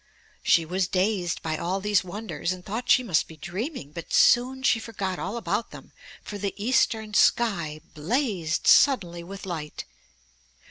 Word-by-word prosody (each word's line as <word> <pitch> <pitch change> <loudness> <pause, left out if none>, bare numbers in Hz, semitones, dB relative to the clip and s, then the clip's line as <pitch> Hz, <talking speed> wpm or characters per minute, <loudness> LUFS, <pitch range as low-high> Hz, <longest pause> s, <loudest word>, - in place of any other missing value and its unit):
She 165 - +3
was 180 +2 -1
dazed 185 -2 0
by 155 -1 -2
all 185 +4 -2
these 205 -1 +1
wonders, 180 -4 -4
and 185 -1 -7
thought 235 +5 -5
she 255 - +5
must 180 -10 +1
be 160 - -13
dreaming, 185 - -5
but 170 +2 -9
soon 260 +2 +4
she 245 - +3
forgot 195 -5 -4
all 200 +5 -4
about 230 0 -2
them, - - -13 0.3
for 205 - -7
the 200 0 -3
eastern 220 -1 +1
sky 170 -10 +2
blazed 180 - -1
suddenly 175 -11 +4
with 195 +3 -9
light. 160 -5 -6
195 Hz, 155 wpm, -26 LUFS, 170-225 Hz, 0.3 s, she